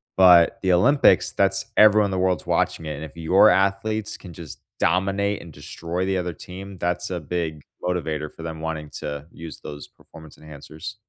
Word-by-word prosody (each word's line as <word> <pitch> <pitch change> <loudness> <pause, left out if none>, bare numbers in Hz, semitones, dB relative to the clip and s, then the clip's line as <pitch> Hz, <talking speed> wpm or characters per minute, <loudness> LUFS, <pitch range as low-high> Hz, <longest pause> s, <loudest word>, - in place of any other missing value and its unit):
But 90 -3 +6
the 95 -1 +1
Olympics, 125 +1 +4
that's 95 0 +1
everyone 105 -1 +6
in 100 - -2
the 95 - -1
world's 90 -1 0
watching 80 - 0
it, 75 - -4
and 75 - -7
if 80 +1 -10
your 90 +6 +5
athletes 100 +3 0
can 90 - -12
just 80 -2 -10 0.2
dominate 100 +2 0
and 85 - -12
destroy 85 +5 -5
the 95 0 0
other 90 -1 -3
team, 95 +3 -10
that's 90 +1 -2
a 90 -2 -3
big 80 -1 -4 0.2
motivator 80 -4 -2
for 80 - -12
them 80 -1 -6
wanting 80 -2 -5
to 70 0 -6
use 85 -1 -10
those 75 -1 -9
performance 80 -1 -16
enhancers. 75 +6 -10
90 Hz, 185 wpm, -23 LUFS, 80-95 Hz, 0.2 s, But